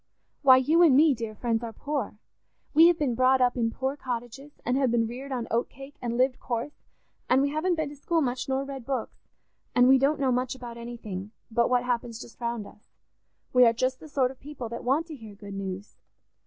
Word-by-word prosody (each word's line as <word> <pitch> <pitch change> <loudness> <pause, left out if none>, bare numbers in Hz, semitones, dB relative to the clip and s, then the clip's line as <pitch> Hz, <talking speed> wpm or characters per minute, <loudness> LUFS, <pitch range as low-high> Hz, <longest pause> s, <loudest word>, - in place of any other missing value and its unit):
Why, 260 -2 +8
you 310 +7 +3
and 300 -7 +6
me, 305 0 +6
dear 225 -3 -5
friends, 230 +1 -1
are 230 - -4
poor. 275 -3 -4 0.6
We 320 +3 +8
have 345 -1 +4
been 285 -6 0
brought 255 +2 +4
up 250 -1 +3
in 230 -2 +1
poor 265 +4 -3
cottages 255 +2 -6
and 245 - +1
have 265 -2 +2
been 230 -1 +2
reared 255 +5 -7
on 245 -3 -3
oat 235 +1 0
cake, 275 +2 -12
and 235 -1 -2
lived 255 0 +2
coarse; 240 +4 -4 0.5
and 255 - +5
we 280 +1 +2
haven't 335 +4 0
been 315 -3 -2
to 295 - -10
school 330 +4 0
much, 255 -3 -2
nor 265 +1 0
read 275 -2 -7
books, 260 -2 -4 0.6
and 245 0 +6
we 265 0 +6
don't 280 +3 +2
know 265 -2 +2
much 250 +1 -1
about 240 -2 -8
anything 225 -4 -7 0.2
but 235 +1 +2
what 250 -1 +2
happens 235 -2 -2
just 240 - -12
round 235 -2 -2
us. 210 - -17 0.6
We 250 0 +7
are 230 - +4
just 255 +2 -1
the 310 - -12
sort 260 -3 +1
of 265 - -15
people 270 -5 -7
that 235 - -6
want 275 +6 +1
to 320 -3 -8
hear 220 -5 -11
good 200 0 -10
news. 195 0 -6
255 Hz, 225 wpm, -27 LUFS, 235-275 Hz, 0.6 s, Why